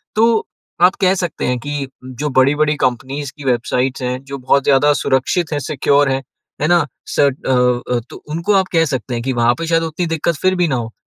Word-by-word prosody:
तो 225 0 +3 0.4
आप 180 +1 +6
कह 185 -1 +4
सकते 175 -3 -3
हैं 125 0 0
कि 145 +1 -4 0.3
जो 150 - 0
बड़ी-बड़ी 150 +3 +3
कंपनीज़ 135 +2 -2
की 145 - -10
वेबसाइट्स 125 +1 0
हैं, 125 +1 -3
जो 140 0 -7
बहुत 130 +1 +2
ज़्यादा 145 +2 +4
सुरक्षित 140 +6 0
हैं, 145 - 0
सिक्योर 140 0 +2
हैं, 135 0 0 0.4
है 150 - +2
ना? 175 0 +4 0.2
शर्ट 140 -1 +1
अ, - - +2 0.4
अ, 120 - +1
तो - - -11
उनको 165 +6 0
आप 190 -1 +3
कह 165 -1 +4
सकते 130 -4 -3
हैं 120 -1 -3
कि 130 +1 -1
वहाँ 120 0 +3
पे 165 - -3
शायद 165 0 +2
उतनी 165 +2 -2
दिक्कत 165 +1 0
फिर 185 0 +2
भी 175 -1 +2
ना 135 - 0
हो। 115 -2 -4
145 Hz, 215 wpm, -18 LUFS, 130-165 Hz, 0.4 s, आप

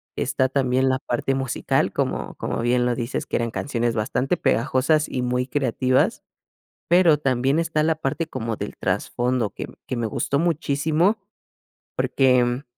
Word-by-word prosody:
Está 130 - +1
también 130 -1 +1
la 130 0 +1
parte 135 +1 -1
musical, 135 -2 0
como - - -2
como - - -3
bien 120 +1 +2
lo 125 - +1
dices, 120 +1 -3
que - - -1
eran 115 0 -1
canciones 120 -2 -1
bastante 125 +9 0
pegajosas 140 +4 +1
y 125 - -2
muy 125 +1 0
creativas, 130 -1 +1 0.7
pero 170 -3 +5
también 135 +1 +1
está 160 -2 +1
la 160 +1 +2
parte 155 +2 -2
como 115 -7 -4
del 105 - -6
trasfondo 120 +4 -1
que - - -6 0.2
que 130 - -3
me 120 -1 -1
gustó 140 +5 -1
muchísimo 160 +4 +1 0.8
porque, 125 -1 +2
130 Hz, 150 wpm, -23 LUFS, 120-150 Hz, 0.8 s, pero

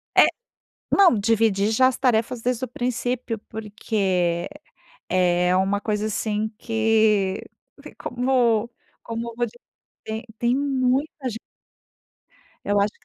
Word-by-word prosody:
É - - +8 0.6
não, 365 - +5
dividir 210 -1 +2
já 255 +4 +5
as 260 - -2
tarefas 235 -2 +1
desde 250 +1 0
o - - -7
princípio, 245 -1 -2
porque 195 -5 -1 0.6
é 180 -1 +2
é - - +3
uma 195 +2 +1
coisa 210 0 -1
assim 215 0 -1
que 220 -4 +2 0.6
como 245 -3 +1 0.3
como 230 0 -5
te 230 - -10
tem 240 +2 +1
muita 270 0 0
ge 225 - -6 1.3
Eu 205 0 +2
acho 200 +1 +2
225 Hz, 110 wpm, -23 LUFS, 205-250 Hz, 1.3 s, É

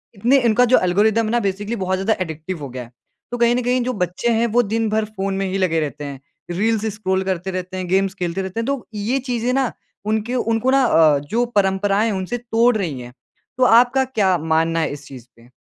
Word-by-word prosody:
इतने 245 +7 +3
इनका 235 +2 +4
जो - - +8
एल्गोरिदम 210 +5 +2
है 215 - -2
ना 240 - +2
बेसिकली 205 +2 -2
बहुत 190 -3 -1
ज़्यादा 220 +3 +1
एडिक्टिव 160 +1 -6
हो 140 - -6
गया 125 0 -6
है। 120 - -15 0.4
तो 245 - -3
कहीं 235 0 +3
न 250 - 0
कहीं 250 +1 +1
जो 255 +1 -2
बच्चे 180 +7 -2
हैं 230 +1 +2
वो - - +7
दिन 225 +1 -1
भर 215 0 0
फ़ोन 195 -2 -4
में 195 - -1
ही 195 - -1
लगे 180 -4 +1
रहते 150 -1 -4
हैं। 140 -2 -7 0.3
रील्स 220 +4 0
स्क्रॉल 190 -2 -1
करते 190 0 -3
रहते 185 0 -5
हैं, 185 -1 -4
गेम्स 190 +1 +1
खेलते 180 -1 -3
रहते 190 +3 -5
हैं 230 - -2
तो 275 -3 -2
ये 215 +6 -1
चीज़ें 240 +1 0
ना 265 -2 +1 0.3
उनके 220 +3 -1
उनको 230 +1 +1
ना 270 0 +4
अ, 160 - +4
जो 220 +13 -1
परंपराएँ 200 +1 +2
हैं 220 - -1
उनसे 190 +6 -3
तोड़ 235 0 +2
रही 160 -10 -3
हैं। 120 0 -11 0.4
तो 255 - +2
आपका 245 +2 +5
क्या 200 -8 +1
मानना 160 +1 0
है 160 - -1
इस 145 0 -9
चीज़ 130 -4 -11
पे? 120 +1 -20
200 Hz, 235 wpm, -20 LUFS, 180-230 Hz, 0.4 s, जो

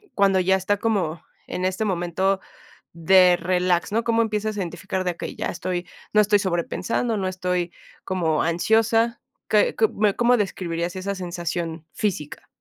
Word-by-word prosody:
cuando 195 -2 +4
ya 190 +1 +3
está 190 +2 0
como 195 -8 -1 0.3
en 180 - -3
este 185 +3 -1
momento 190 +1 0 0.6
de 180 +2 +5
relax?, 180 +1 0
¿no? 225 +2 +2
Cómo 230 -1 +2
empiezas 215 -1 -2
a - - -2
identificar 190 +1 -3
de 180 -2 -1
que - - -6
ya - - -3
estoy, 180 0 -3 0.3
no 210 - +5
estoy 205 0 +4
sobrepensando, 190 +5 -1
no 190 -2 -1
estoy 180 -1 -2 0.3
como 165 -5 0
ansiosa. 225 +7 +2 0.3
¿Qué 210 - +3
qué 220 - +5
me 205 -1 +1
cómo 245 +1 +4
describirías 175 -4 -2
esa 195 +2 -3
sensación 170 -3 -4
física? 195 - -3
185 Hz, 155 wpm, -23 LUFS, 175-210 Hz, 0.6 s, de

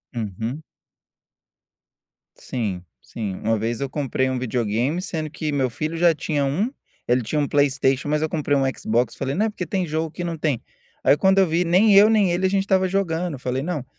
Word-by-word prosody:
Uhum. 115 - -4 1.7
Sim, 100 -8 -4 0.2
sim, 105 -5 -5
uma 115 +1 +2
vez 115 +2 -2
eu 140 - -3
comprei 130 -2 -1
um 130 -1 -2
videogame, 125 - -1
sendo 160 -4 -4
que 150 +1 -4
meu 135 -3 +1
filho 155 +7 -4
já 170 0 +5
tinha 150 -2 -1
1, 185 - 0 0.4
ele 125 +1 +3
tinha 120 +7 -2
1 145 - +1
Playstation, 140 -1 +1
mas 150 0 +1
eu 155 - 0
comprei 145 -2 0
1 135 - +2
Xbox, 120 +3 0
falei: 135 +1 -3
"Não 210 - +2
é - - 0
porque 195 -4 -5
tem 185 +2 -1
jogo 160 0 -2
que 175 - -6
não 170 -1 -3
tem", 150 -6 0 0.4
aí, - - +5
quando 190 +4 +3
eu 190 - +5
vi, 165 +2 +1
nem 185 +5 +4
eu 205 +2 +8
nem 210 -5 +3
ele, 175 +2 0
a - - +3
gente 195 0 +1
estava 190 -1 +2
jogando, 180 -3 -1
eu - - -11
falei: 130 +1 -2
"Não", 155 -4 -3
150 Hz, 210 wpm, -23 LUFS, 130-175 Hz, 1.7 s, eu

